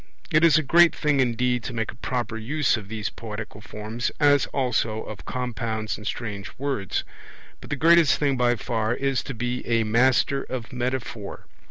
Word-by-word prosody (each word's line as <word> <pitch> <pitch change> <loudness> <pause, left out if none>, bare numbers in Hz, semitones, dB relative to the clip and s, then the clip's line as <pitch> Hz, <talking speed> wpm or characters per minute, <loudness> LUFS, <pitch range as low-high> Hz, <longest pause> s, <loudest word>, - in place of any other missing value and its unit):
It 155 +2 +4
is 165 -2 +7
a 155 - +2
great 170 +4 +5
thing, 150 -2 +1
indeed, 125 -1 +1
to 125 - -4
make 110 -2 -2
a - - -16
proper 120 -1 -3
use 130 +6 +1
of 105 -4 -7
these 110 0 -4
poetical 105 -2 -7
forms, 110 +3 -4
as 145 -2 +4
also 120 -4 -1
of 110 - -9
compounds 115 -3 -3
and 105 - -8
strange 105 -3 -4
words. 135 -8 -2 0.6
But - - -12
the 145 - -1
greatest 165 +1 +5
thing 140 -2 +1
by 120 -1 +2
far 115 0 -1
is 135 0 0
to 135 - -7
be 125 +2 -2
a 115 -1 +2
master 130 +5 +3
of 125 -2 -6
metaphor. 125 -4 -4
120 Hz, 180 wpm, -25 LUFS, 110-135 Hz, 0.6 s, is